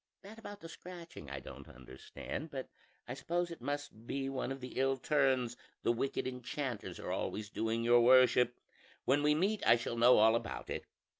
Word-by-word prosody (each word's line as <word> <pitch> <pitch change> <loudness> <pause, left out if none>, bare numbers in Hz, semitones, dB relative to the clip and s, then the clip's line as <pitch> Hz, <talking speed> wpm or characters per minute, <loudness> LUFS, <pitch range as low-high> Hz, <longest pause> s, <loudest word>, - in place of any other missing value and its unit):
"That 215 +3 -11
about 205 -2 -9
the 165 - -8
scratching 170 - -10
I 70 -1 -5
don't - - -11
understand; 65 - -8
but 135 -3 -5 0.4
I 125 - -4
suppose 170 +6 -2
it 170 - -8
must 145 -6 -5
be 135 0 -2
one 135 -1 -3
of 135 - -4
the 125 0 -6
ill 135 0 +2
turns 130 -5 +2 0.3
the - - +3
wicked 125 +3 -1
enchanters 125 -2 -4
are - - -4
always 105 -1 -3
doing 115 +1 -1
your 120 +1 +6
worship; 125 0 +5 0.5
when 140 +3 +3
we 150 0 +4
meet 200 +6 +1
I - - +7
shall 120 0 -3
know 120 +2 +7
all 110 +1 +6
about 115 - -4
it. - - -4
130 Hz, 190 wpm, -34 LUFS, 120-150 Hz, 0.5 s, I